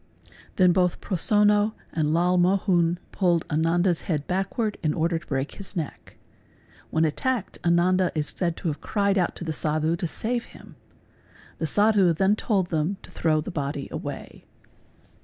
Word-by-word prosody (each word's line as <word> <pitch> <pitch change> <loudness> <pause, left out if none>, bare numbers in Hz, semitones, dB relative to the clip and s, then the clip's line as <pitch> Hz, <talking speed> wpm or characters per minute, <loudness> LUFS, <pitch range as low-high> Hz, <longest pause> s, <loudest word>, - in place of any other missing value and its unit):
Then 185 -2 +5
both 180 -1 +1
Prosonno 210 +3 +2 0.2
and 155 -2 0
Lal 175 +3 +2
Mohun 180 -2 +2
pulled 175 -4 +1
Ananda's 165 +3 +2
head 150 -4 0
backward 200 +4 -2
in 155 -2 0
order 165 +1 0
to - - -20
break 135 +1 -2
his 200 0 -8
neck. 160 -5 -6 0.7
When 160 +1 +2
attacked 225 - -2
Ananda 175 +1 +3
is" 150 -1 0
said 170 -3 -2
to 175 - -2
have 150 0 -5
cried 200 -2 +1
out 175 - 0
to - - -7
the 160 -2 -3
Sadhu 155 +2 0
to 175 - -2
save 235 +8 -2
him. - - -15 0.8
The 160 - -1
Sadhu 205 -1 +4
then 190 +5 +2
told 195 -5 0
them 160 +5 0
to - - -13
throw 155 -2 +1
the 160 - -6
body 140 -3 -3
away. - - -7
175 Hz, 160 wpm, -25 LUFS, 160-195 Hz, 0.8 s, Then